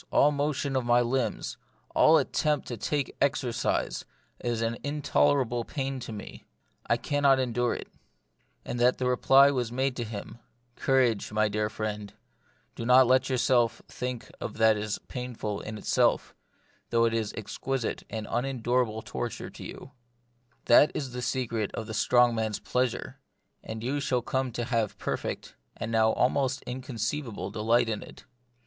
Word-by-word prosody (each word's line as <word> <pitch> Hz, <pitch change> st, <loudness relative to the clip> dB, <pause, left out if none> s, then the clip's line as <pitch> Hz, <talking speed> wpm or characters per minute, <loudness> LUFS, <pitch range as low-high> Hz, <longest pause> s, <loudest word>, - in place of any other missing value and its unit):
all 145 Hz, -, +5 dB
motion 140 Hz, -1 st, -1 dB
of 130 Hz, -, +1 dB
my 120 Hz, 0 st, +4 dB
limbs, 125 Hz, +1 st, -1 dB, 0.4 s
all 160 Hz, +1 st, +6 dB
attempt 150 Hz, 0 st, 0 dB
to 120 Hz, -, -4 dB
take 140 Hz, +5 st, -2 dB
exercise, 125 Hz, -4 st, 0 dB, 0.4 s
is 120 Hz, -1 st, -1 dB
an 115 Hz, +1 st, 0 dB
intolerable 140 Hz, -4 st, +1 dB
pain 135 Hz, +1 st, -3 dB
to 120 Hz, -2 st, -7 dB
me; 105 Hz, -2 st, -9 dB, 0.4 s
I -, -, +3 dB
cannot 145 Hz, -2 st, +3 dB
endure 120 Hz, -2 st, 0 dB
it;" -, -, -7 dB, 0.8 s
and 120 Hz, -, -4 dB
that 125 Hz, +1 st, +4 dB
the 130 Hz, -, -2 dB
reply 135 Hz, +2 st, +6 dB
was 125 Hz, -4 st, -1 dB
made 130 Hz, +1 st, 0 dB
to 120 Hz, -, -1 dB
him, 110 Hz, +1 st, -7 dB, 0.2 s
" 120 Hz, 0 st, -42 dB
Courage, 125 Hz, -7 st, +2 dB
my 110 Hz, 0 st, +2 dB
dear 105 Hz, 0 st, -1 dB
friend; 105 Hz, -2 st, -5 dB, 0.6 s
do -, -, -6 dB
not 125 Hz, +2 st, +7 dB
let 130 Hz, +2 st, +3 dB
your 130 Hz, -, +1 dB
self 120 Hz, -2 st, +2 dB
think 125 Hz, -1 st, -5 dB
of -, -, -5 dB
that 110 Hz, -1 st, +5 dB
as 105 Hz, 0 st, -2 dB
painful 120 Hz, -5 st, -4 dB
in 110 Hz, 0 st, -6 dB
itself, -, -, +1 dB, 0.6 s
though 115 Hz, 0 st, +3 dB
it 115 Hz, -, +1 dB
is 110 Hz, -2 st, -1 dB
exquisite 125 Hz, +3 st, -3 dB
and 110 Hz, -1 st, -4 dB
unendurable 120 Hz, -3 st, 0 dB
torture 120 Hz, -2 st, -5 dB
to -, -, -10 dB
you: 135 Hz, -, -9 dB, 0.7 s
that 130 Hz, +5 st, +7 dB
is 135 Hz, -4 st, -3 dB
the 125 Hz, 0 st, -5 dB
secret 115 Hz, -5 st, -1 dB
of 110 Hz, -, -4 dB
the 110 Hz, -, -6 dB
strong 120 Hz, +2 st, +4 dB
man's 110 Hz, -2 st, -1 dB
pleasure, 125 Hz, -1 st, -2 dB, 0.4 s
and 110 Hz, 0 st, -6 dB
you 135 Hz, +4 st, -1 dB
shall 125 Hz, -3 st, 0 dB
come 130 Hz, 0 st, -1 dB
to 120 Hz, -, -2 dB
have 115 Hz, -4 st, -1 dB
perfect -, -, -4 dB, 0.2 s
and 115 Hz, -, -4 dB
now 110 Hz, -1 st, +4 dB
almost 130 Hz, +1 st, +1 dB
inconceivable 125 Hz, -4 st, -4 dB
delight 115 Hz, +3 st, +2 dB
in 110 Hz, -2 st, -2 dB
it. -, -, -12 dB
120 Hz, 160 wpm, -28 LUFS, 110-130 Hz, 0.8 s, not